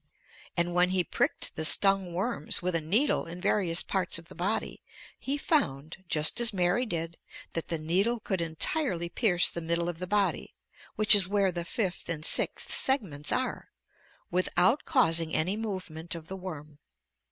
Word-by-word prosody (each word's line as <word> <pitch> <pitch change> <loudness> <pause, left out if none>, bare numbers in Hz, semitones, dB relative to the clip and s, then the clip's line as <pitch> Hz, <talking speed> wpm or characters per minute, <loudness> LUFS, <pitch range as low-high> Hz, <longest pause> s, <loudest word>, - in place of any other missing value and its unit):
And 170 0 0
when 180 +1 +3
he 185 -1 +1
pricked - - -2
the 160 - -3
stung 195 +2 +5
worms 185 - 0
with 180 +1 -3
a 165 - 0
needle 205 - +1
in 170 +2 -8
various 180 -2 +1
parts 185 -3 -1
of 170 0 -12
the - - -11
body, 195 +5 -3 0.4
he 275 +2 -2
found, 160 - -1
just 155 +8 +3
as 235 - +3
Mary 190 +6 +1
did, 165 -3 -4 0.4
that 165 - -4
the 165 - -2
needle 190 +10 0
could 190 -4 -3
entirely 170 - -1
pierce 180 -4 +2
the 170 - -4
middle 170 +1 -1
of 175 -2 -5
the 180 - -5
body 205 +1 0 0.4
(which 215 0 +7
is 200 -3 +6
where 200 -1 +1
the 175 -1 -4
fifth 185 0 -4
and 155 -2 -2
sixth - - +1
segments 180 - 0
are), 255 0 -2 0.6
without 185 +7 +1
causing 165 - +2
any 180 +6 +1
movement 185 -7 -6
of 165 -1 -10
the 190 - -5
worm. 155 -6 -9
180 Hz, 170 wpm, -28 LUFS, 165-205 Hz, 0.6 s, which